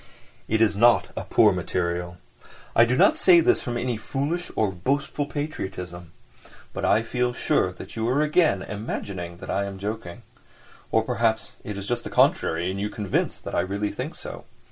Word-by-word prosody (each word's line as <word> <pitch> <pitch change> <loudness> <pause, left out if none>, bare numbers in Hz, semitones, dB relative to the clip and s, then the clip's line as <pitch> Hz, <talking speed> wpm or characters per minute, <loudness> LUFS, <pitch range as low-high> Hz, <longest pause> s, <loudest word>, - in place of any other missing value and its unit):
It 110 0 +1
is 110 -3 +4
not 120 +3 +4
a - - -4
poor - - +5
material! 85 0 -2 0.6
I 115 - +7
do 125 +2 0
not - - +5
say 180 -2 +7
this 165 - +3
from 120 -1 -3
any 120 -1 -1
foolish 145 +10 -3
or 105 -3 +1
boastful 140 +9 -1
patriotism. 95 - -5 0.6
But - - -2
I 115 - +3
feel 125 +1 -1
sure 95 - +1
that 95 +2 -10
you 115 +1 -1
are 140 +4 +2
again 150 - +2
imagining 95 -4 -5
that - - -6
I 100 - 0
am 100 -1 -6
joking. 100 -3 -5 0.7
Or 110 - +3
perhaps 115 -2 0
it's 100 -2 -5
just 120 0 -1
the - - -6
contrary 85 +3 +2
and 95 - -4
you 105 - -1
are - - -7
convinced 105 -3 -2
that - - -6
I - - +2
really 100 +3 -1
think - - -5
so. - - -9
110 Hz, 185 wpm, -25 LUFS, 95-125 Hz, 0.7 s, I